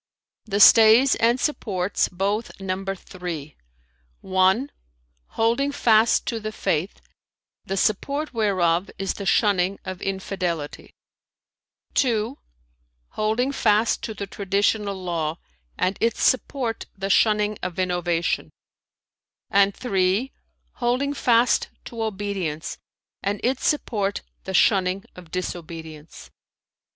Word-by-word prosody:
"[FN#336] - - -16
"The 200 - +2
stays 225 +5 +7
and 235 +2 +2
supports 200 - 0
both 200 +5 -2
number 195 0 -3
three: 170 -6 -7 0.7
(1) 190 +8 +2 0.7
holding 235 +6 +2
fast 225 -4 +3
to 230 - -2
the 215 0 -5
Faith, 175 -4 -2 0.7
the 195 - -3
support 280 +10 0
whereof 185 -5 +1
is 195 0 -2
the 200 - -6
shunning 195 -3 +2
of 185 -1 -6
infidelity; 185 -5 -4 1.0
(2) 235 0 0 0.7
holding 220 +5 0
fast 220 -4 +2
to 220 - -5
the 200 - -4
Traditional 200 +1 0
Law, 170 -4 -3 0.4
and 185 +2 0
its 230 -1 +1
support 255 -3 0
the 195 0 -2
shunning 210 0 +3
of 180 -1 -4
innovation; 175 -2 0 1.0
and 200 -1 +4
(3) 200 +2 0 0.5
holding 255 +3 0
fast 240 -3 +2 0.2
to 230 -1 -6
obedience, 195 -7 -3 0.4
and 200 +1 -2
its 255 +2 0
support 205 -9 -1 0.2
the 190 - -5
shunning 190 -1 +3
of 180 -2 -13
disobedience." 160 -3 -7
200 Hz, 110 wpm, -24 LUFS, 185-225 Hz, 1.0 s, stays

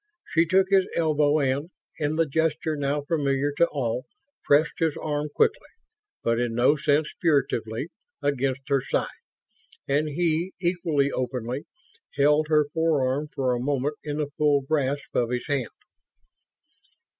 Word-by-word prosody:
She 165 0 +3
took 190 +2 +3
his 190 -1 +4
elbow 155 -2 +2
and, 140 +2 0 0.3
in 150 +1 0
the 165 +1 +2
gesture 160 +1 0
now 145 0 -1
familiar 145 -2 0
to 170 - +5
all, 125 -5 -3 0.4
pressed 150 +3 +3
his 160 -2 +1
arm 150 -1 -2
quickly, - - +1 0.6
but 115 0 +1
in 120 -2 -1
no 125 +5 +4
sense 150 0 +1
furtively, 140 -5 0 0.3
against 135 -1 -1
her 140 -1 +3
side. - - 0 0.8
And 145 +3 +1
he, 170 +3 0
equally 170 -6 +1
openly, 125 +1 -3 0.5
held 150 +2 +3
her 150 -1 +3
forearm 150 -3 +1
for 130 -2 0
a 120 - -1
moment 140 +2 -1
in 145 -1 -4
the 150 -2 -2
full 145 -2 +3
grasp 140 0 -1
of 120 -1 +1
his 125 0 -2
hand. 140 -6 -1
145 Hz, 145 wpm, -25 LUFS, 135-155 Hz, 0.8 s, to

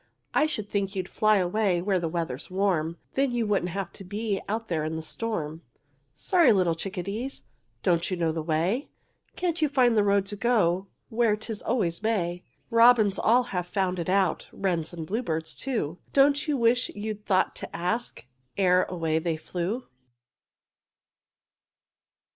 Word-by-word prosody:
I 305 - +4
should 215 -9 -3
think 200 -1 -2
you'd 185 -1 -2
fly 215 +1 +3
away 185 0 +1
Where 190 +1 +1
the 165 -2 -2
weather's 160 -6 -4
warm, 180 -4 0 0.2
Then 275 0 +2
you 240 -2 0
wouldn't 200 -4 +1
have 195 +2 -4
to - - -11
be 205 +1 -2
Out 225 +2 -2
there 160 -3 -1
in 155 +1 -2
the 160 - -4
storm. 160 -5 -4 0.5
Sorry 345 -9 +4
little 185 -5 +3
chickadees, 200 +9 -4 0.4
Don't 170 -1 +2
you 185 - -2
know 165 -2 +1
the 160 0 -3
way? 170 - 0 0.5
Can't 345 -3 -1
you 305 - +3
find 250 -4 +3
the 210 - +4
road 200 -1 +3
to 205 +1 -4
go 200 -4 +2 0.2
Where 230 -2 +2
'tis 220 0 -6
always 185 -8 0
May? 180 -5 -1 0.3
Robins 230 -3 +5
all 245 +3 +4
have 180 -1 -1
found 185 -1 -1
it 170 - -3
out, 190 -2 +1
Wrens 170 -5 -1
and 165 -2 -6
bluebirds 165 -5 -2
too, 180 - -2
Don't 280 +2 +4
you 295 -2 +1
wish 240 +1 +3
you'd 210 0 -5
thought 190 -2 +1
to - - -7
ask 180 - -2 0.3
Ere 185 -2 +4
away 165 -3 -1
they 160 -1 -1
flew? 180 +9 -3
195 Hz, 165 wpm, -27 LUFS, 170-225 Hz, 0.5 s, Robins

